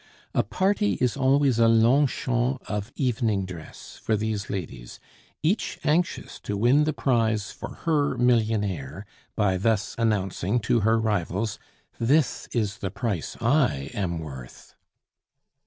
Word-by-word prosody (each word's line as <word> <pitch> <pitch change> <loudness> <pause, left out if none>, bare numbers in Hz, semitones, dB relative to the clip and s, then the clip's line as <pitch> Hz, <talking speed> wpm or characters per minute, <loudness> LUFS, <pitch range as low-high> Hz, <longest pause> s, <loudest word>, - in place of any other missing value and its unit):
A - - +3
party 205 +2 +1
is 125 -2 0
always 135 -2 +3
a 115 - +6
Longchamps 125 +2 +2
of 105 +3 -4
evening 115 -6 0
dress 85 -4 -10
for 110 - +1
these 105 -2 -3
ladies, 80 -11 -6 0.4
each 185 +8 0
anxious 160 +4 0
to 100 - -4
win 130 +8 +4
the 155 - +1
prize 110 -8 0
for - - -8
her 145 -5 +1
millionaire 105 - 0 0.3
by 100 -4 +2
thus 105 +1 0
announcing 105 -1 0
to 115 +2 +2
her 115 +1 +3
rivals: 105 -1 -1 0.4
"This 140 +5 +1
is 105 -4 -1
the 95 - -3
price 100 -5 -3
I 120 - +1
am 90 -4 -2
worth!" 65 -6 -9
115 Hz, 130 wpm, -25 LUFS, 100-130 Hz, 0.4 s, a